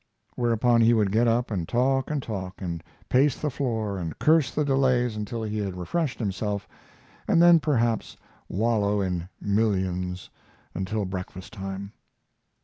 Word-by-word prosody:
Whereupon 120 Hz, 0 st, +3 dB
he 115 Hz, +1 st, +5 dB
would 105 Hz, -3 st, +2 dB
get 115 Hz, +3 st, +3 dB
up 115 Hz, +1 st, +1 dB
and 90 Hz, -5 st, -2 dB
talk 130 Hz, +2 st, +1 dB
and 145 Hz, -3 st, -2 dB
talk, 95 Hz, -4 st, -5 dB
and 85 Hz, -4 st, -4 dB, 0.2 s
pace 135 Hz, +3 st, +3 dB
the 150 Hz, -, -1 dB
floor 110 Hz, -7 st, -2 dB
and 80 Hz, -3 st, -5 dB
curse 155 Hz, -4 st, +4 dB
the 150 Hz, -, -1 dB
delays 130 Hz, -4 st, +2 dB
until 110 Hz, +2 st, -4 dB
he 105 Hz, 0 st, -2 dB
had 95 Hz, -3 st, -3 dB
refreshed 145 Hz, -, -2 dB
himself, 100 Hz, -2 st, -2 dB, 0.6 s
and -, -, +4 dB
then 170 Hz, -1 st, +7 dB
perhaps 120 Hz, -7 st, 0 dB, 0.3 s
wallow 105 Hz, 0 st, +1 dB
in 90 Hz, -2 st, -2 dB
millions 95 Hz, -4 st, -1 dB, 0.4 s
until 100 Hz, +2 st, -2 dB
breakfast 95 Hz, +1 st, -7 dB
time. 95 Hz, -1 st, -6 dB
110 Hz, 145 wpm, -26 LUFS, 95-125 Hz, 0.6 s, then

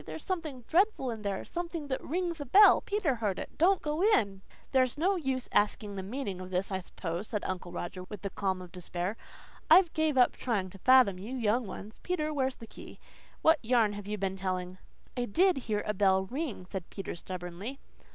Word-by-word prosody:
"There's 160 Hz, +1 st, -8 dB
something 315 Hz, -9 st, -3 dB
dreadful 350 Hz, -, +2 dB
in 220 Hz, -2 st, -6 dB
there 200 Hz, -2 st, -3 dB
something 340 Hz, -3 st, -4 dB
that 265 Hz, -, -2 dB
rings 340 Hz, 0 st, -2 dB
a -, -, -4 dB
bell. 405 Hz, +11 st, +7 dB
Peter 405 Hz, -9 st, 0 dB
heard 210 Hz, -6 st, -1 dB
it. -, -, -7 dB
Don't 375 Hz, +4 st, +4 dB
go 300 Hz, +2 st, -1 dB
in." 210 Hz, -, +3 dB, 0.3 s
"There's 255 Hz, -1 st, +2 dB
no 375 Hz, +6 st, +2 dB
use 265 Hz, -7 st, -2 dB
asking 205 Hz, 0 st, +1 dB
the 195 Hz, -, -4 dB
meaning 200 Hz, -2 st, -4 dB
of 185 Hz, -, -7 dB
this, 185 Hz, +2 st, -1 dB
I 190 Hz, -, 0 dB
suppose," 180 Hz, +1 st, -5 dB
said 210 Hz, -3 st, -3 dB
Uncle 185 Hz, -1 st, -4 dB
Roger 180 Hz, +1 st, -5 dB
with 205 Hz, 0 st, -9 dB
the 200 Hz, -, -3 dB
calm 190 Hz, -2 st, -2 dB
of 180 Hz, -, -12 dB
despair. 180 Hz, +2 st, -4 dB, 0.5 s
"I've 360 Hz, -3 st, +7 dB
gave 315 Hz, -3 st, +1 dB
up 250 Hz, -, +6 dB
trying 200 Hz, -7 st, -1 dB
to 195 Hz, -, -13 dB
fathom 250 Hz, -6 st, +5 dB
you 225 Hz, +7 st, -6 dB
young 235 Hz, -1 st, +1 dB
ones. 210 Hz, +3 st, -9 dB
Peter, 310 Hz, -4 st, -1 dB
where's 265 Hz, -2 st, 0 dB
the 230 Hz, -, -11 dB
key? -, -, -12 dB, 0.4 s
What 320 Hz, -1 st, +5 dB
yarn 225 Hz, -3 st, +3 dB
have 205 Hz, -1 st, -7 dB
you 210 Hz, 0 st, -2 dB
been 190 Hz, -1 st, -2 dB
telling?" 185 Hz, -1 st, -3 dB, 0.4 s
"I 245 Hz, -1 st, -1 dB
DID 360 Hz, -, +3 dB
hear 210 Hz, -1 st, 0 dB
a 210 Hz, -, 0 dB
bell 190 Hz, -1 st, +3 dB
ring," 255 Hz, -, -4 dB
said 185 Hz, -1 st, -6 dB
Peter 195 Hz, -, -5 dB
stubbornly. 180 Hz, +7 st, -6 dB
215 Hz, 205 wpm, -30 LUFS, 190-295 Hz, 0.5 s, bell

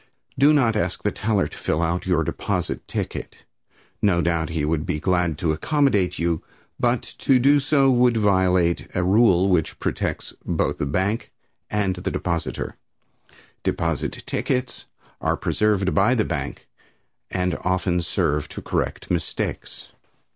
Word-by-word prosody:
Do 140 Hz, +3 st, +5 dB
not 125 Hz, -7 st, +3 dB
ask 105 Hz, -, -1 dB
the -, -, +1 dB
teller 105 Hz, -2 st, 0 dB
to -, -, -12 dB
fill 80 Hz, -, 0 dB
our 85 Hz, +2 st, 0 dB
your 90 Hz, -3 st, +2 dB
deposit -, -, -3 dB
ticket. -, -, -5 dB, 0.6 s
No 95 Hz, -4 st, +3 dB
doubt 85 Hz, -1 st, 0 dB
he 80 Hz, -3 st, -1 dB
would 75 Hz, 0 st, 0 dB
be 90 Hz, -4 st, -2 dB
glad 90 Hz, -2 st, +1 dB
to 80 Hz, -1 st, 0 dB
accommodate 105 Hz, -, +1 dB
you, 85 Hz, -1 st, 0 dB, 0.4 s
but -, -, +1 dB, 0.2 s
to 135 Hz, -, +4 dB
do 140 Hz, +4 st, +5 dB
so 135 Hz, -1 st, +3 dB
would 120 Hz, -1 st, +4 dB
violate 95 Hz, -4 st, +2 dB
a 90 Hz, -, +1 dB
rule 95 Hz, -1 st, +4 dB
which 90 Hz, -4 st, +1 dB
protects -, -, -3 dB
both -, -, -1 dB
the 70 Hz, -, -1 dB
bank 95 Hz, +10 st, -1 dB, 0.4 s
and 100 Hz, -3 st, 0 dB
the 90 Hz, -, -3 dB
depositor, 85 Hz, -2 st, -3 dB, 0.8 s
Deposit 85 Hz, -2 st, -2 dB
tickets 125 Hz, -1 st, -2 dB, 0.4 s
are -, -, +1 dB
preserved 100 Hz, -3 st, +1 dB
by 100 Hz, +6 st, +4 dB
the 110 Hz, -, +1 dB
bank, 70 Hz, -4 st, -4 dB, 0.6 s
and 90 Hz, -1 st, -1 dB
often 90 Hz, -1 st, +1 dB
serve 75 Hz, -2 st, -1 dB
to -, -, -7 dB
correct -, -, -2 dB
mistakes. 85 Hz, -2 st, -3 dB
90 Hz, 145 wpm, -23 LUFS, 85-110 Hz, 0.8 s, Do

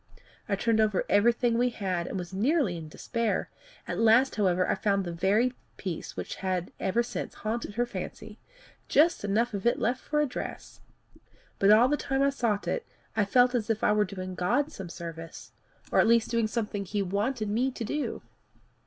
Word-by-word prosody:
I 200 Hz, -, +2 dB
turned 225 Hz, +2 st, +1 dB
over 210 Hz, -3 st, +1 dB
everything 235 Hz, +3 st, +3 dB
we 250 Hz, +1 st, +3 dB
had, 185 Hz, -6 st, -2 dB
and -, -, -4 dB
was 180 Hz, 0 st, -6 dB
nearly 235 Hz, -, +1 dB
in 160 Hz, -2 st, -7 dB
despair. 230 Hz, +6 st, -2 dB, 0.4 s
At -, -, -3 dB
last, 230 Hz, +4 st, +5 dB
however, 185 Hz, -3 st, +2 dB
I -, -, +2 dB
found 200 Hz, -2 st, 0 dB
the 175 Hz, -, -3 dB
very 205 Hz, +9 st, +2 dB, 0.2 s
piece 180 Hz, -5 st, -5 dB
which -, -, -5 dB
had 185 Hz, -2 st, -2 dB
ever 230 Hz, +5 st, +1 dB
since 235 Hz, -, -5 dB
haunted 220 Hz, -1 st, -4 dB
her 240 Hz, +1 st, +1 dB
fancy 215 Hz, 0 st, -7 dB, 0.5 s
just 325 Hz, -2 st, +3 dB
enough 220 Hz, +4 st, +1 dB
of 200 Hz, +3 st, -1 dB
it 240 Hz, -, +3 dB
left 245 Hz, +3 st, 0 dB
for 300 Hz, -, -1 dB
a 300 Hz, -, +3 dB
dress! 255 Hz, -, -7 dB, 0.8 s
But 195 Hz, -, +4 dB
all 220 Hz, +4 st, +7 dB
the 295 Hz, +2 st, +1 dB
time 270 Hz, -1 st, 0 dB
I 280 Hz, -, +3 dB
sought 230 Hz, -7 st, -1 dB
it, 475 Hz, -, -1 dB, 0.3 s
I 205 Hz, -, +2 dB
felt 245 Hz, +4 st, +4 dB
as 230 Hz, -3 st, -1 dB
if 220 Hz, -1 st, 0 dB
I -, -, +4 dB
were 210 Hz, 0 st, +3 dB
doing 185 Hz, -1 st, -6 dB
God 230 Hz, -, 0 dB
service 170 Hz, -, -8 dB, 0.4 s
or -, -, +3 dB
at -, -, +5 dB
least 230 Hz, 0 st, +3 dB
doing 230 Hz, -2 st, +2 dB
something 210 Hz, -2 st, -2 dB
he 205 Hz, +2 st, -1 dB
wanted 210 Hz, +5 st, -1 dB
me 245 Hz, +5 st, +1 dB
to 250 Hz, -2 st, -6 dB
do. 290 Hz, +7 st, -3 dB
215 Hz, 190 wpm, -28 LUFS, 195-240 Hz, 0.8 s, all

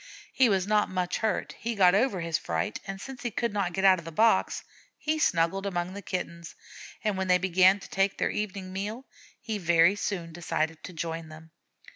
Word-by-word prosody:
He 255 Hz, -3 st, +4 dB
was 190 Hz, -3 st, +2 dB
not 210 Hz, 0 st, +2 dB
much 180 Hz, -1 st, -1 dB
hurt. 220 Hz, -1 st, -1 dB
He 230 Hz, +1 st, -3 dB
got 180 Hz, -3 st, +5 dB
over 200 Hz, -3 st, +2 dB
his 165 Hz, -1 st, -1 dB
fright, 85 Hz, +5 st, -2 dB
and 195 Hz, 0 st, -5 dB
since 265 Hz, +4 st, -8 dB
he 240 Hz, -, -2 dB
could 235 Hz, 0 st, -2 dB
not 195 Hz, -4 st, 0 dB
get 190 Hz, +2 st, -1 dB
out 190 Hz, -2 st, +6 dB
of 170 Hz, -, -12 dB
the 165 Hz, -, -6 dB
box, 220 Hz, +8 st, +2 dB, 0.3 s
he 310 Hz, +1 st, -1 dB
snuggled 185 Hz, -, +1 dB
among 180 Hz, -1 st, -2 dB
the 200 Hz, -, -7 dB
Kittens, 170 Hz, -2 st, -5 dB, 0.5 s
and 210 Hz, -3 st, 0 dB
when 190 Hz, -, -1 dB
they 180 Hz, 0 st, +5 dB
began 185 Hz, +2 st, +4 dB
to -, -, -11 dB
take 195 Hz, 0 st, 0 dB
their -, -, 0 dB
evening 195 Hz, -3 st, -4 dB
meal 210 Hz, +7 st, -4 dB, 0.3 s
he 220 Hz, -2 st, -4 dB
very 170 Hz, +1 st, +4 dB
soon 175 Hz, -5 st, -3 dB
decided 160 Hz, -1 st, -2 dB
to 185 Hz, -, -9 dB
join 165 Hz, 0 st, -4 dB
them. 160 Hz, +1 st, -13 dB
190 Hz, 205 wpm, -28 LUFS, 170-205 Hz, 0.5 s, out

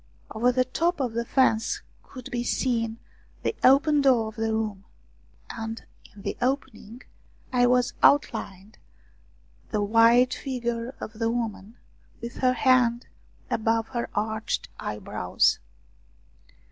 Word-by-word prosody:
Over 235 Hz, +3 st, +2 dB
the 255 Hz, 0 st, +1 dB
top 335 Hz, +6 st, 0 dB
of 250 Hz, -4 st, -1 dB
the 235 Hz, +1 st, -1 dB
fence 235 Hz, -3 st, +1 dB, 0.2 s
could 255 Hz, -3 st, -11 dB
be 240 Hz, 0 st, -2 dB
seen 230 Hz, -3 st, -1 dB, 0.5 s
the -, -, 0 dB
open 290 Hz, +3 st, +5 dB
door 245 Hz, -5 st, +3 dB
of 220 Hz, -, -14 dB
the 225 Hz, 0 st, -1 dB
room, 215 Hz, -3 st, -2 dB, 0.7 s
and 225 Hz, 0 st, -6 dB, 0.3 s
in 200 Hz, -, -13 dB
the -, -, -3 dB
opening 250 Hz, -3 st, -3 dB, 0.5 s
was 245 Hz, 0 st, +3 dB
outlined 215 Hz, -7 st, +1 dB, 0.9 s
the 210 Hz, -2 st, 0 dB
white 230 Hz, +4 st, +5 dB
figure 240 Hz, -2 st, -4 dB
of 220 Hz, -, -7 dB
the 225 Hz, -1 st, +1 dB
woman 230 Hz, -2 st, -4 dB, 0.4 s
with 235 Hz, 0 st, -7 dB
her 255 Hz, -1 st, +2 dB
hand 250 Hz, -2 st, +3 dB, 0.5 s
above 225 Hz, 0 st, 0 dB
her 240 Hz, -2 st, -3 dB
arched 220 Hz, +1 st, -2 dB
eyebrows. 105 Hz, 0 st, 0 dB
235 Hz, 120 wpm, -26 LUFS, 220-255 Hz, 0.9 s, open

